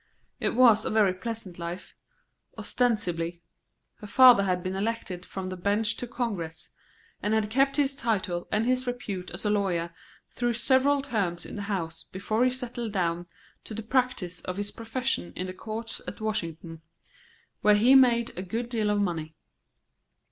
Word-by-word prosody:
It - - 0
was 230 -4 +6
a - - -1
very 210 -4 +3
pleasant 190 -2 -6
life, 170 +2 -6 0.6
ostensibly. 175 -8 -1 0.5
Her 210 - -10
father 250 0 +8
had 180 -2 0
been 185 0 -3
elected 195 -3 -3
from 190 -1 -5
the 185 - -4
bench 205 +4 +1
to 245 - -5
Congress, 195 -10 -4 0.5
and 210 +1 +1
had 215 -1 0
kept 275 +3 +3
his 280 -2 +2
title 205 -9 -1
and 215 +2 +2
his 255 +1 +1
repute 205 -7 -4
as 175 +5 -4
a 210 - +2
lawyer 175 -5 0 0.4
through 240 -1 0
several 270 +3 +3
terms 195 -10 -2
in - - -8
the 205 - -4
House 170 -5 -3
before 215 +5 -1
he 255 - +4
settled 240 -3 -4
down 175 -2 -1 0.4
to 220 - -8
the 220 - -5
practice 240 -7 0
of 185 0 -5
his 205 0 -3
profession 230 -3 -2
in 180 - -2
the 185 - -5
courts 225 +3 -5
at 180 - -6
Washington, 165 -6 -4 0.8
where 210 0 +6
he 235 +6 +5
made 240 -3 +5
a 180 - -3
good 225 +6 -3
deal 220 -3 0
of 205 0 +2
money. 160 -5 -2
210 Hz, 170 wpm, -27 LUFS, 180-235 Hz, 0.8 s, father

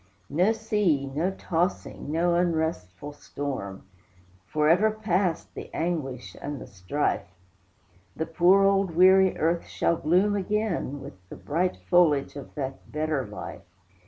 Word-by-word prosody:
No 180 +9 +3
sea, 210 -10 +1
no 150 +7 -1
tossing, 180 -5 -2
no 170 +2 +2
unrestful 160 - -1
storm! 135 -10 -6 0.6
Forever 165 - +3
past 195 -5 -1
the - - -8
anguish 150 -7 -3
and 145 -1 -5
the - - -8
strife; 100 +10 -2 0.9
The 160 - -2
poor 180 +4 +4
old 195 -3 +2
weary 190 +1 +6
earth 165 +2 0
shall 170 - 0
bloom 185 +7 +2
again, 200 -8 -1
With - - -9 0.2
the - - -8
bright 175 +5 -1
foliage 155 -7 +3
of 140 - -9
that 135 -2 -6
better 150 -3 -1
life. - - -8
165 Hz, 130 wpm, -26 LUFS, 145-185 Hz, 0.9 s, weary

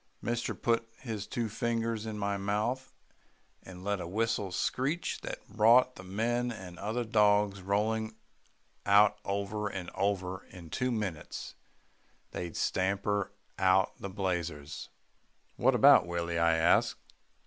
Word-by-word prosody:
Mister 120 0 -2
put 115 -1 0
his 110 -5 -5
two 120 -2 -2
fingers 115 0 -2
in 105 -1 -4
his 100 -1 -1
mouth 110 +7 -1 0.7
and 90 -1 -11
let 100 -1 -1
a 85 - -5
whistle 105 0 -1
screech 135 - -1
that - - -7
brought 115 +4 +5
the - - -9
men 120 +6 -1
and 90 -5 -9
other 110 +4 -1
dogs 105 -3 +3
rolling 110 +3 0 0.7
out 100 +1 +5
over 100 +1 -2
and 90 -3 -5
over, 95 -2 -1
and - - -21
in 85 -3 -10
two 125 0 0
minutes 100 -9 -4 0.8
they'd 85 -2 -5
stamped 95 +1 0 0.5
out 95 0 +4
the 100 - -5
blazes." 85 -7 -3 0.7
"What - - +3
about - - +7
Willie," 85 -1 -2
I 85 0 +4
asked. 80 +2 +3
100 Hz, 135 wpm, -31 LUFS, 95-115 Hz, 0.8 s, about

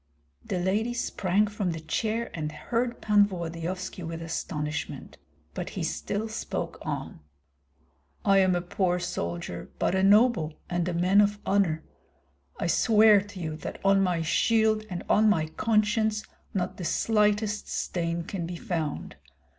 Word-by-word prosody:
The 185 - -3
lady 210 +7 0
sprang 205 -3 +1
from 205 -4 -2
the 165 - -5
chair 220 +9 -2
and 155 -2 -3
heard 235 +10 -2
Pan 205 -1 +5
Volodyovski 180 +1 -5
with 165 -1 -5
astonishment; 150 -2 -4 0.3
but - - -4
he - - -1
still 210 +2 -2
spoke 220 - -4
on: - - -5 1.1
"I 195 -1 +5
am 185 -1 +4
a 175 - -1
poor 180 0 0
soldier, 85 - -4
but - - +1
a 190 - +2
noble, 200 -6 +4 0.2
and 175 0 0
a - - -2
man 185 +4 +5
of 205 0 +2
honor. 185 -6 +1 0.8
I - - -1
swear 215 -2 +5
to 205 -1 -10
you 160 -3 -3
that - - -7
on 195 0 +5
my 180 -3 +1
shield 220 +5 +2
and 180 -2 -4
on 215 0 +4
my 160 -6 +2
conscience 215 +2 +1 0.3
not 180 -3 -2
the 180 - -6
slightest 210 +2 +1
stain 170 -1 -2
can 170 -1 -4
be 175 - -5
found. 170 -6 -4
190 Hz, 150 wpm, -27 LUFS, 170-210 Hz, 1.1 s, Pan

